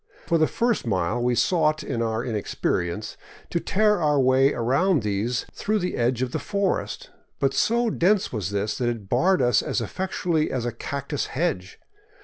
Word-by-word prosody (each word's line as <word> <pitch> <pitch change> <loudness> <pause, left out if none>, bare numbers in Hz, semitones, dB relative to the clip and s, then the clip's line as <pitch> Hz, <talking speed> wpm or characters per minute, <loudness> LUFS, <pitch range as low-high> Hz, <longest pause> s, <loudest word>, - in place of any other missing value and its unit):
For 165 -1 +2
the 155 - +4
first 235 - 0
mile 100 +3 0
we 120 0 +1
sought, 155 0 +2
in 115 - -3
our 115 0 -1
inexperience, 105 -3 -2 0.3
to 170 - +1
tear 210 +1 +2
our 150 -2 +3
way 130 +1 +4
around 140 - +1
these 105 +4 -1
through 215 +1 -1
the 180 -3 -2
edge 120 +1 +1
of 125 - -3
the - - -2
forest. 200 -2 -2 0.3
But 135 0 +1
so 235 - +2
dense 195 0 +2
was 100 -5 -2
this 100 +1 -2
that 120 -1 +1
it 110 -5 -5
barred 175 +5 +3
us 120 -3 +3
as - - -1
effectually 170 - -1
as 125 -2 -2
a 120 - -1
cactus 140 +4 -4
hedge. 135 - -2
130 Hz, 175 wpm, -24 LUFS, 115-175 Hz, 0.3 s, the